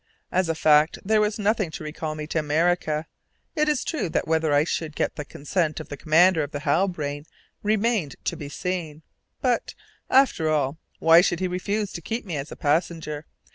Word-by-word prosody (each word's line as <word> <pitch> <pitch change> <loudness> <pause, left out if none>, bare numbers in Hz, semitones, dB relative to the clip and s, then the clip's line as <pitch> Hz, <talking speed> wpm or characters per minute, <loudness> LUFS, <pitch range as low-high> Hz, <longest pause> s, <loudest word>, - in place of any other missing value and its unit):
As 185 -2 +1
a 165 - +1
fact 155 0 +4
there 215 +1 +3
was 210 0 0
nothing 210 -3 +1
to 155 - -7
recall 155 0 -4
me 155 0 -5
to 160 +1 -1
America. 155 0 +1 0.5
It 305 -1 +2
is 295 -4 +1
true 305 - -2
that - - -1
whether 160 -1 +1
I 145 0 +4
should 155 -1 -3
get - - -1
the 150 - -4
consent 155 +3 -2
of 155 - -9
the 145 - -5
commander 165 +4 +4
of 145 - -3
the 145 - -5
Halbrane 150 -2 -1 0.3
remained 215 -6 +1
to - - -1
be 145 - -7
seen; 160 -1 -4 0.4
but, 250 -3 0 0.3
after 255 - +4
all, 150 0 0 0.2
why 165 +1 +7
should 175 -2 0
he 185 - 0
refuse 200 +3 -2
to 170 - -6
keep 225 +8 -4
me 175 -5 -4
as 140 +1 -5
a - - -6
passenger? 155 0 -1
160 Hz, 195 wpm, -25 LUFS, 150-190 Hz, 0.5 s, why